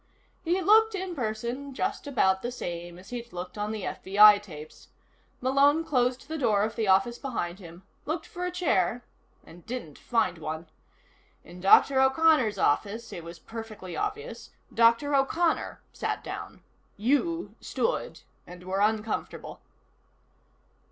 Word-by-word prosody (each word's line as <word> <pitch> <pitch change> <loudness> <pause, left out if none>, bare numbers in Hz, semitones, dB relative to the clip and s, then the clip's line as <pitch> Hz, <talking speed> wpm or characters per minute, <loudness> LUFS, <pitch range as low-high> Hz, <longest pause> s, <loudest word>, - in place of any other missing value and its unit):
He 355 +2 +1
looked, 440 +3 +5
in 375 -1 -4
person, 245 +2 -4
just - - -2
about 190 -9 +2
the 240 - -3
same 175 -6 -6
as 190 +5 -14
he'd 240 -1 -6
looked 180 0 -7
on 210 0 -3
the 215 -3 -5
FBI 205 +1 +5
tapes. 155 -6 -12 0.5
Malone 280 +5 +3
closed 250 -2 0
the 315 +1 -4
door 215 -6 +2
of 220 +1 -2
the 220 -2 -1
office 195 +6 +3
behind 190 -9 -4
him, 175 0 -12 0.2
looked 320 +2 -2
for 360 -5 -7
a 360 - 0
chair 245 - 0 0.4
and 170 +1 -15
didn't 235 - -6
find 225 -8 0
one. 155 +1 -5 0.8
In 180 +1 -12
Dr. 265 +7 +6
O'Connor's 265 -5 +3
office, 205 +9 0
it 170 - -7
was 170 +1 -9
perfectly 220 -2 -8
obvious, 425 +4 -4 0.2
Dr. 235 +5 +4
O'Connor 320 +5 +1
sat - - -3
down. - - -8 0.3
You 290 - 0
stood, - - -2 0.3
and 180 0 -11
were 190 +2 -2
uncomfortable. 215 +1 -2
230 Hz, 140 wpm, -27 LUFS, 190-285 Hz, 0.8 s, Dr